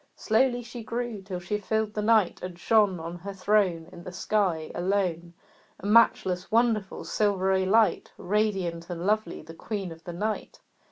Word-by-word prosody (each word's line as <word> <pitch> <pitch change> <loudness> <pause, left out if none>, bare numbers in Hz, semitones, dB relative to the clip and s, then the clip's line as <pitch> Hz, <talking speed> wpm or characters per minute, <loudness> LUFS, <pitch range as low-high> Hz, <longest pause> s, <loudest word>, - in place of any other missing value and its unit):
Slowly 245 +2 +1
she 235 0 -8
grew 230 -2 -4
till 190 -2 -5
she 195 +4 -3
filled 220 +1 -1
the 210 - -2
night, 215 -4 +3
And 180 -1 -6
shone 205 -2 +3
On 170 +2 -6
her 200 +2 -7
throne 185 -4 +1
In 170 - -11
the 180 - -7
sky 180 -4 0
alone, 175 -2 -1 0.4
A - - -10
matchless, 200 -4 +3
wonderful, 220 -3 +1
silvery 190 -2 +1
light, 220 +2 +3
Radiant 190 -5 -1
and 175 0 -4
lovely, 210 -5 0
the 165 +1 -11
Queen 195 +1 -5
of 165 0 -12
the 175 - -7
night. 210 +5 -3
195 Hz, 165 wpm, -27 LUFS, 175-215 Hz, 0.4 s, night